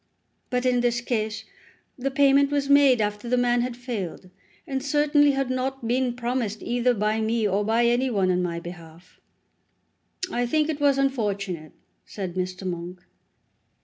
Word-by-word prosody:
"But 250 0 -1
in 250 -1 +3
this 240 0 +1
case 220 -3 -3 0.5
the 270 +1 -2
payment 275 0 +4
was 285 -1 0
made 275 -4 +6
after 210 +2 -2
the 250 - +2
man 245 0 +2
had 245 0 -3
failed, 205 -7 -6 0.3
and 270 -1 -3
certainly 290 0 +3
had 270 -1 -1
not 255 -1 -2
been 245 0 0
promised 240 -3 -2
either 245 0 +1
by 215 +1 0
me 220 0 +1
or 200 +1 0
by 225 +3 +2
any 240 +2 +2
one 195 -5 +1
on 180 0 +1
my 170 -1 -2
behalf." 170 0 -12 1.1
"I 245 0 0
think 305 +4 +1
it 300 -2 -3
was 280 -1 +4
unfortunate," 200 - -2 0.3
said 190 -4 -6
Mr. 185 +1 -4
Monk. 180 0 -5
240 Hz, 160 wpm, -25 LUFS, 200-265 Hz, 1.1 s, made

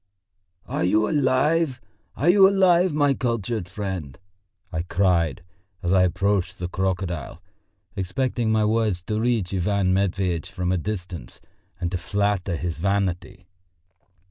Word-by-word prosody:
"Are - - -2
you 105 +4 +3
alive, 145 0 +2 0.4
are 145 - -1
you 190 +2 +7
alive, 185 -2 +4
my 145 -2 +3
cultured 115 -6 -2
friend?" 95 -8 -5 0.5
I 80 - -2
cried, 85 -5 +1 0.4
as 90 +1 +1
I 95 - +5
approached 95 +1 +1
the 90 - -3
crocodile, 90 -5 -3 0.6
expecting 115 +4 -1
my 110 -1 +2
words 105 -5 0
to 105 +3 -2
reach 115 -6 0
Ivan 95 0 +1
Matveitch 95 -3 0
from 90 -2 -2
a 95 - +1
distance 90 - -6 0.4
and 85 -1 -2
to 90 - -2
flatter 100 -1 -1
his 85 0 -4
vanity. 95 -1 -1
95 Hz, 130 wpm, -24 LUFS, 90-115 Hz, 0.6 s, you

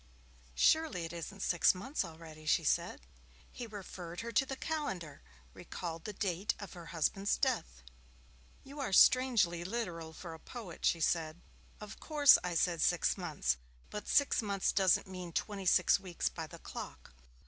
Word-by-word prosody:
'Surely 310 - +3
it 165 - -7
isn't 190 +4 -7
six 175 +1 +4
months 260 +10 -2
already,' 160 -2 -11
she - - +3
said. - - 0 0.5
He 240 - -7
referred 185 -5 -7
her 235 0 -5
to 270 +3 +2
the 270 - -4
calendar, 265 - -4 0.3
recalled 165 -2 -7
the 210 - -4
date 190 0 -1
of 200 - -9
her 170 -2 -10
husband's 175 +5 0
death. - - -1 0.8
'You 280 +2 -11
are 255 -8 -2
strangely 220 -8 +5
literal 175 -6 -4
for 165 +1 -9
a 160 - -10
poet,' 210 -7 -8
she 165 - +2
said. 160 0 0 0.4
'Of 210 0 -9
course 295 -3 +6
I 180 -1 -2
said 170 -1 +1
six - - +2
months, 65 -1 -1 0.3
but 210 - -6
six 285 -4 +3
months 200 -3 0
doesn't 190 -2 +3
mean 180 -2 -8
twenty 195 0 -3
six 175 - +5
weeks 185 -3 -2
by - - -6
the - - -11
clock. 65 - -9
185 Hz, 160 wpm, -33 LUFS, 165-220 Hz, 0.8 s, course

